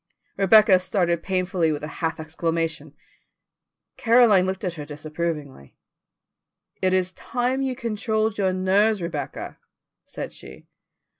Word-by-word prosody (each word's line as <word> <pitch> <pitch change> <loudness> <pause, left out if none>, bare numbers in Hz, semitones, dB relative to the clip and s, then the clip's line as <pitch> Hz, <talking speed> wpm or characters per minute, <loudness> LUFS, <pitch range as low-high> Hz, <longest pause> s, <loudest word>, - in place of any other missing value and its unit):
Rebecca 195 0 +6
started 180 -2 0
painfully 185 -3 0
with 150 -1 -4
a - - -3
half 165 0 -1
exclamation. 160 -2 -3 1.0
Caroline 225 -6 +5
looked 190 +1 -3
at 180 -3 -2
her 155 -3 -7
disapprovingly. 150 - -6 1.0
"It 185 - +2
is 185 0 +1
time 250 +2 -2
you 265 -1 -1
controlled 220 -2 -1
your 190 -2 +2
nerves, 195 +3 +2
Rebecca," 170 -4 -5 0.5
said - - -7
she. - - -12
185 Hz, 120 wpm, -24 LUFS, 165-210 Hz, 1.0 s, Rebecca